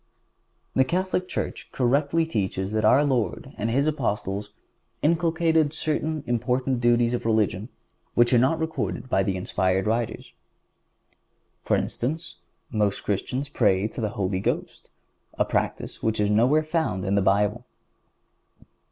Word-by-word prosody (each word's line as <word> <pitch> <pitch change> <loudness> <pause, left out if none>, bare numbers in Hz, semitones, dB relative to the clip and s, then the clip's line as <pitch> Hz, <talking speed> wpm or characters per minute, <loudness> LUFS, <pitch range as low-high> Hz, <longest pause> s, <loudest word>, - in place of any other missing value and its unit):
The 130 - +5
Catholic 185 +5 -1
Church - - -4
correctly 140 +6 +2
teaches 95 -8 -2
that 110 0 0
our 130 +7 +5
Lord 130 -1 -1
and 110 - -2
His 135 +5 +2
Apostles 105 -8 -2 0.5
inculcated 160 -1 +2
certain 155 -1 -2
important 125 +1 0
duties 120 0 +3
of 120 - -2
religion 110 -1 0 0.5
which 120 +1 +4
are 120 - +6
not 130 +6 +3
recorded 130 - -3
by 95 - +3
the 95 -1 -1
inspired 95 +1 0
writers.(150) 115 +1 -2 1.3
For - - +4
instance, 155 +7 -3 0.3
most 105 -3 0
Christians 125 +7 -2
pray 105 -7 +2
to 115 - -6
the 110 - 0
Holy 95 -1 0
Ghost, - - -3 0.5
a - - +2
practice - - -2
which 110 -1 0
is 105 0 +2
nowhere 125 +9 +4
found 155 - -1
in 95 - 0
the 100 - +3
Bible. 105 +4 +2
120 Hz, 135 wpm, -25 LUFS, 105-145 Hz, 1.3 s, are